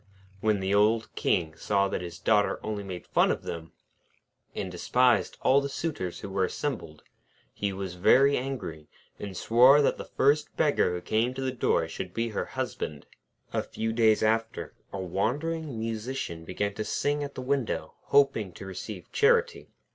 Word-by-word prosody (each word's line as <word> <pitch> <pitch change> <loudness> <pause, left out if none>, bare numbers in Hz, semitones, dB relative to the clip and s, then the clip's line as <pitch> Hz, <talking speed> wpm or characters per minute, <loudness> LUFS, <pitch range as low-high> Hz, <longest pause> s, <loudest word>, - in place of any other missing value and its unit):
When 105 -1 +1
the 95 +1 0
old 110 +2 +3
King 80 -3 0
saw 100 -1 +1
that 95 - -3
his 85 -1 -7
Daughter 105 +1 +2
only 105 -1 -3
made 90 -3 -7
fun - - +3
of - - -1
them, 80 -1 -6 0.8
and 95 -3 -3
despised 125 +8 +2
all 135 +2 +5
the 140 - -3
suitors 135 - -4
who 100 - -6
were 95 -1 +1
assembled, 95 - -4 0.5
he 100 -1 -2
was 95 -2 -5
very 135 +10 +5
angry, 105 - -5 0.3
and 100 -3 -6
swore 125 +8 +6
that - - +2
the - - -4
first 145 +2 +1
beggar 145 - +2
who 90 - -4
came 115 +7 0
to 135 - -4
the 130 - 0
door 85 -9 +1
should 90 +2 -7
be 115 0 0
her 110 - -2
husband. 75 -2 -4 0.5
A - - +1
few 110 0 -3
days 110 -2 +4
after, 115 +1 0 0.2
a 100 - -5
wandering 135 - -2
Musician 110 -6 -4
began 100 +4 -2
to 110 - -3
sing 145 +7 -1
at 140 0 -7
the 130 - -5
window, 135 -3 -1
hoping 125 -10 +3
to - - -9
receive 95 0 -7
charity. 465 0 +2
110 Hz, 170 wpm, -28 LUFS, 95-135 Hz, 0.8 s, swore